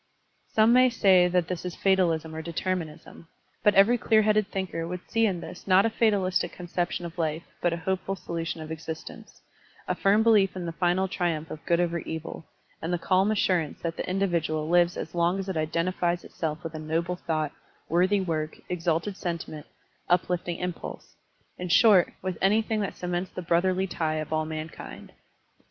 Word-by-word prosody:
Some 220 Hz, +2 st, +4 dB
may 255 Hz, +1 st, +6 dB
say 190 Hz, -6 st, +5 dB
that 180 Hz, -1 st, +1 dB
this 180 Hz, -2 st, -4 dB
is 180 Hz, -1 st, -5 dB
fatalism 170 Hz, -5 st, +1 dB
or 160 Hz, -, -4 dB
deter 170 Hz, +3 st, -2 dB
minism, 165 Hz, -1 st, -9 dB, 0.3 s
but 210 Hz, -1 st, +4 dB
every 220 Hz, +5 st, +6 dB
clear 220 Hz, -1 st, +4 dB
headed 215 Hz, -1 st, +3 dB
thinker 180 Hz, -4 st, -3 dB
would 180 Hz, +1 st, -6 dB
see 225 Hz, 0 st, +2 dB
in 180 Hz, -4 st, -2 dB
this 180 Hz, -, -10 dB
not 190 Hz, +2 st, +5 dB
a 225 Hz, -, +1 dB
fatalistic 190 Hz, -6 st, +1 dB
conception 175 Hz, 0 st, -3 dB
of 170 Hz, +1 st, -8 dB
life 160 Hz, 0 st, -1 dB, 0.2 s
but 175 Hz, -, +2 dB
a 170 Hz, -, -2 dB
hopeful 190 Hz, +1 st, -1 dB
solution 165 Hz, -3 st, -4 dB
of 155 Hz, 0 st, -7 dB
existence, 160 Hz, 0 st, -8 dB, 0.4 s
a -, -, +1 dB
firm 205 Hz, +3 st, +3 dB
belief 210 Hz, -5 st, +4 dB
in 180 Hz, -2 st, -4 dB
the 165 Hz, -, -3 dB
final 180 Hz, +3 st, +1 dB
triumph 170 Hz, -4 st, -2 dB
of 150 Hz, -, -7 dB
good 170 Hz, 0 st, +3 dB
over 170 Hz, -1 st, 0 dB
evil, 160 Hz, 0 st, -6 dB, 0.3 s
and 165 Hz, -, -3 dB
the 175 Hz, -, +1 dB
calm 185 Hz, +3 st, +2 dB
assurance 180 Hz, -7 st, +1 dB
that 165 Hz, -1 st, -3 dB
the -, -, -4 dB
individual 170 Hz, -5 st, 0 dB
lives 175 Hz, +1 st, +3 dB
as 160 Hz, -, -5 dB
long 175 Hz, +2 st, +2 dB
as 195 Hz, 0 st, -4 dB
it 190 Hz, -, -3 dB
identifies 170 Hz, +2 st, 0 dB
itself 155 Hz, -1 st, -4 dB
with 165 Hz, -1 st, -6 dB
a 155 Hz, -, -5 dB
noble 165 Hz, +3 st, -1 dB
thought, 155 Hz, -4 st, -2 dB, 0.4 s
worthy 185 Hz, +5 st, +3 dB
work, 160 Hz, -4 st, -2 dB
exalted 175 Hz, +2 st, -1 dB
sentiment, 170 Hz, -5 st, -5 dB, 0.4 s
uplifting 175 Hz, -1 st, +1 dB
impulse, 180 Hz, -2 st, -6 dB, 0.4 s
in 180 Hz, 0 st, -4 dB
short, 200 Hz, -1 st, +6 dB
with 185 Hz, -2 st, -3 dB
anything 215 Hz, +2 st, +2 dB
that 200 Hz, -, -4 dB
cements 180 Hz, +1 st, -2 dB
the -, -, -6 dB
brotherly 185 Hz, +3 st, +2 dB
tie 160 Hz, -4 st, -2 dB
of 155 Hz, 0 st, -3 dB
all 155 Hz, 0 st, +1 dB
mankind. 155 Hz, 0 st, -7 dB
175 Hz, 180 wpm, -27 LUFS, 165-190 Hz, 0.4 s, may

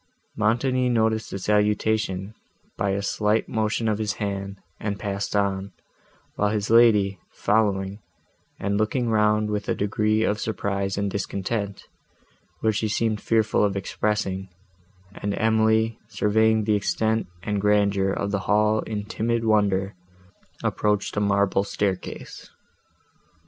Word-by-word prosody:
—Montoni 125 Hz, +4 st, +1 dB
noticed 110 Hz, -2 st, +1 dB
the -, -, -4 dB
salutation 105 Hz, -1 st, 0 dB, 0.4 s
by 100 Hz, -, -1 dB
a 100 Hz, +1 st, -1 dB
slight 105 Hz, +2 st, +1 dB
motion 110 Hz, 0 st, -1 dB
of 105 Hz, -1 st, 0 dB
his 105 Hz, -2 st, -1 dB
hand, 100 Hz, -1 st, -4 dB, 0.2 s
and 100 Hz, -2 st, -3 dB
passed 100 Hz, 0 st, -3 dB
on, 100 Hz, -1 st, 0 dB, 0.6 s
while 105 Hz, -, +1 dB
his 105 Hz, 0 st, -1 dB
lady, 105 Hz, -5 st, +5 dB
following, 100 Hz, -2 st, 0 dB, 0.6 s
and 100 Hz, +1 st, -1 dB
looking 115 Hz, +3 st, 0 dB
round 105 Hz, -1 st, +2 dB
with 105 Hz, -1 st, -3 dB
a -, -, +1 dB
degree 110 Hz, +2 st, +1 dB
of 105 Hz, -1 st, 0 dB
surprise 100 Hz, -3 st, -2 dB
and 100 Hz, -1 st, -1 dB
discontent, 100 Hz, +1 st, -3 dB, 0.8 s
which 110 Hz, -2 st, +1 dB
she 110 Hz, -, 0 dB
seemed 110 Hz, 0 st, 0 dB
fearful 110 Hz, -2 st, +2 dB
of 100 Hz, -1 st, +1 dB
expressing, 95 Hz, -1 st, -2 dB, 0.6 s
and 100 Hz, -1 st, -3 dB
Emily, 110 Hz, 0 st, +2 dB
surveying 110 Hz, +1 st, +2 dB
the 105 Hz, 0 st, +1 dB
extent 110 Hz, +1 st, 0 dB, 0.2 s
and 105 Hz, -1 st, -1 dB
grandeur 100 Hz, -1 st, +2 dB
of 100 Hz, +1 st, -2 dB
the 100 Hz, -, 0 dB
hall 105 Hz, +1 st, +3 dB
in 105 Hz, -2 st, -4 dB
timid 115 Hz, +2 st, -1 dB
wonder, 100 Hz, -2 st, +2 dB, 0.7 s
approached 105 Hz, -1 st, 0 dB
a -, -, +1 dB
marble 100 Hz, -1 st, +2 dB
staircase. 100 Hz, -2 st, -4 dB
105 Hz, 130 wpm, -24 LUFS, 100-110 Hz, 0.8 s, lady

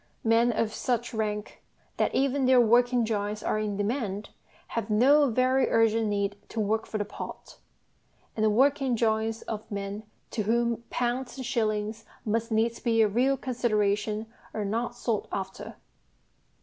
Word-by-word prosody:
Men 230 Hz, +1 st, +4 dB
of 220 Hz, -1 st, -1 dB
such 240 Hz, 0 st, -1 dB
rank 210 Hz, -1 st, -3 dB, 0.4 s
that -, -, +1 dB
even 275 Hz, 0 st, +2 dB
their 255 Hz, -1 st, +6 dB
working 245 Hz, +1 st, +4 dB
drawings 210 Hz, -1 st, -2 dB
are 215 Hz, -, 0 dB
in 210 Hz, -2 st, -2 dB
demand 205 Hz, -2 st, -2 dB, 0.4 s
have 230 Hz, -2 st, -3 dB
no 270 Hz, +7 st, +5 dB
very 255 Hz, +2 st, +2 dB
urgent 225 Hz, -1 st, +3 dB
need 200 Hz, -1 st, -1 dB
to 230 Hz, -, -4 dB
work 220 Hz, +1 st, 0 dB
for 215 Hz, -, -3 dB
the 205 Hz, -, -1 dB
pot; -, -, -9 dB, 0.8 s
and 215 Hz, -, -1 dB
the 215 Hz, -, +5 dB
working 270 Hz, +3 st, +3 dB
drawings 220 Hz, 0 st, 0 dB
of 215 Hz, -1 st, -6 dB
men 200 Hz, 0 st, -4 dB, 0.3 s
to 225 Hz, -, -1 dB
whom 235 Hz, +2 st, 0 dB
pounds 245 Hz, +2 st, -2 dB
and 260 Hz, -, -5 dB
shillings 215 Hz, -1 st, -1 dB, 0.2 s
must 225 Hz, +2 st, -1 dB
needs 225 Hz, +1 st, +1 dB
be 225 Hz, -2 st, +3 dB
a -, -, +4 dB
real 255 Hz, +6 st, +2 dB
consideration 215 Hz, -4 st, 0 dB, 0.3 s
are 215 Hz, -2 st, -2 dB
not 230 Hz, +4 st, -2 dB
sought 230 Hz, -3 st, -2 dB
after. 190 Hz, -1 st, -5 dB
225 Hz, 155 wpm, -28 LUFS, 210-240 Hz, 0.8 s, their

